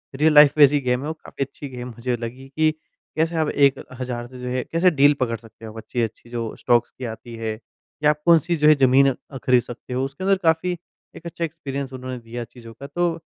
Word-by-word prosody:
Real 155 Hz, +3 st, +3 dB
life 150 Hz, -1 st, +8 dB
base 145 Hz, -2 st, +8 dB
ही 145 Hz, -, +2 dB
game 125 Hz, +1 st, +1 dB
है, 145 Hz, -, -5 dB
वो 160 Hz, -, -2 dB
काफ़ी 155 Hz, -3 st, -6 dB
अच्छी 140 Hz, +1 st, -10 dB
गेम 125 Hz, 0 st, -5 dB
मुझे 120 Hz, +1 st, -3 dB
लगी 120 Hz, +3 st, -7 dB
कि 155 Hz, 0 st, +4 dB, 0.5 s
कैसे 165 Hz, +1 st, +1 dB
हम 155 Hz, -2 st, +1 dB
1 130 Hz, -3 st, 0 dB
से 125 Hz, 0 st, -12 dB
जो 125 Hz, -, -6 dB
है 125 Hz, 0 st, -1 dB
कैसे 175 Hz, +2 st, +4 dB
डील 145 Hz, +1 st, +7 dB
पकड़ 115 Hz, -3 st, 0 dB
सकते 115 Hz, 0 st, -15 dB
हैं 110 Hz, -, -8 dB
वो 110 Hz, -, -12 dB
अच्छी-अच्छी 115 Hz, 0 st, -4 dB
जो 115 Hz, -2 st, -4 dB
स्टॉक्स 120 Hz, -1 st, +2 dB
की 130 Hz, -, -5 dB
आती 115 Hz, +1 st, -11 dB
है, 110 Hz, -1 st, -3 dB
कि 150 Hz, +5 st, -6 dB
आप 150 Hz, 0 st, +2 dB
कौन-सी 170 Hz, 0 st, +4 dB
जो 150 Hz, -1 st, +3 dB
है 155 Hz, -, +8 dB
ज़मीन 135 Hz, 0 st, +5 dB, 0.2 s
अ, 135 Hz, -, -6 dB
ख़रीद 125 Hz, -1 st, +3 dB
सकते 120 Hz, +1 st, -9 dB
हो, 130 Hz, +1 st, 0 dB
उसके 135 Hz, +6 st, -7 dB
अंदर 195 Hz, 0 st, +3 dB
काफ़ी 165 Hz, +2 st, +2 dB, 0.4 s
एक 165 Hz, -, -12 dB
अच्छा 170 Hz, 0 st, -5 dB
एक्सपीरियंस 140 Hz, -4 st, -6 dB
उन्होंने 130 Hz, 0 st, -6 dB
दिया 120 Hz, +1 st, -7 dB
चीज़ों 115 Hz, 0 st, -13 dB
का। 140 Hz, +5 st, -10 dB
तो 170 Hz, +2 st, -1 dB
130 Hz, 235 wpm, -22 LUFS, 120-155 Hz, 0.5 s, life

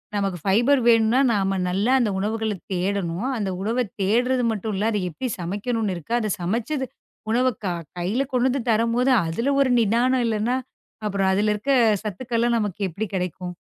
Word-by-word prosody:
நமக்கு 195 Hz, -3 st, -1 dB
பைபர் 240 Hz, +8 st, +4 dB
வேணுனா, 230 Hz, +1 st, +4 dB
நாம 195 Hz, -2 st, 0 dB
நல்லா 200 Hz, +7 st, +1 dB
அந்த 235 Hz, -4 st, +1 dB
உணவுகளைத் 215 Hz, 0 st, -2 dB
தேடணும். 185 Hz, +2 st, -1 dB
அந்த 205 Hz, -3 st, -2 dB
உணவைத் 225 Hz, +1 st, -1 dB
தேடுறது 245 Hz, +6 st, +2 dB
மட்டும் 215 Hz, 0 st, -3 dB
இல்ல. 210 Hz, +4 st, +1 dB
அதை 210 Hz, -, 0 dB
எப்படி 255 Hz, +10 st, -4 dB
சமைக்கணும்னு 205 Hz, +4 st, -2 dB
இருக்கு. 170 Hz, +6 st, -6 dB
அதைச் 215 Hz, -3 st, -2 dB
சமைச்சது 235 Hz, -, -1 dB, 0.5 s
உணவ 250 Hz, +3 st, +3 dB, 0.2 s
க -, -, 0 dB, 0.3 s
கைல 190 Hz, +9 st, 0 dB
கொண்டு 250 Hz, 0 st, +3 dB
வந்து 265 Hz, +1 st, -1 dB
தரும்போது, 230 Hz, +4 st, +2 dB, 0.2 s
அதுல 230 Hz, +12 st, 0 dB
ஒரு 270 Hz, -, +3 dB
நிதானம் 240 Hz, +4 st, +2 dB
இல்லன்னா, 225 Hz, +2 st, 0 dB, 0.5 s
அப்புறம் 195 Hz, -2 st, +1 dB
அதுல 210 Hz, +2 st, +2 dB
இருக்க 215 Hz, +7 st, -2 dB, 0.3 s
சத்துக்கள்லாம் 235 Hz, +3 st, 0 dB
நமக்கு 205 Hz, -2 st, -3 dB
எப்படி 200 Hz, +6 st, -4 dB
கெடைக்கும்? 180 Hz, 0 st, -3 dB
215 Hz, 160 wpm, -23 LUFS, 195-240 Hz, 0.5 s, பைபர்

